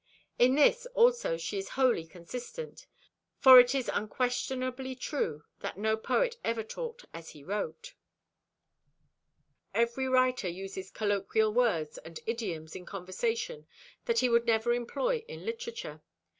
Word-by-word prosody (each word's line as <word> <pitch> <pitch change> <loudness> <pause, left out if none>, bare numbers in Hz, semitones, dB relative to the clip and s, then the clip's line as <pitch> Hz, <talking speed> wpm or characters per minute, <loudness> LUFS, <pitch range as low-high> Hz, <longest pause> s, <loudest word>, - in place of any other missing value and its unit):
In 255 +2 +5
this 480 - +4
also 475 - +4
she 180 +5 -3
is 195 - -6
wholly 245 -11 +2
consistent: 250 - -8 0.5
for 260 -2 +10
it 250 +2 +5
is 265 -3 -1
unquestionably 255 +3 -2
true 165 - -3 0.2
that - - -5
no 220 +2 +1
poet 475 - 0
ever 230 -1 -1
talked 475 - -7
as 165 -1 -9
he 145 - -13
wrote. 210 - -4 1.8
Every 235 +3 +1
writer 255 -5 +2
uses 190 +1 -7
colloquial 210 +1 0
words 205 -11 +1
and 165 0 -10
idioms 185 -9 -4
in 180 - -7
conversation 455 - -3 0.4
that 470 -1 +1
he - - +3
would 235 0 +2
never 230 +1 +3
employ 455 - -1
in 480 - -9
literature. 460 0 -6
240 Hz, 130 wpm, -30 LUFS, 195-295 Hz, 1.8 s, for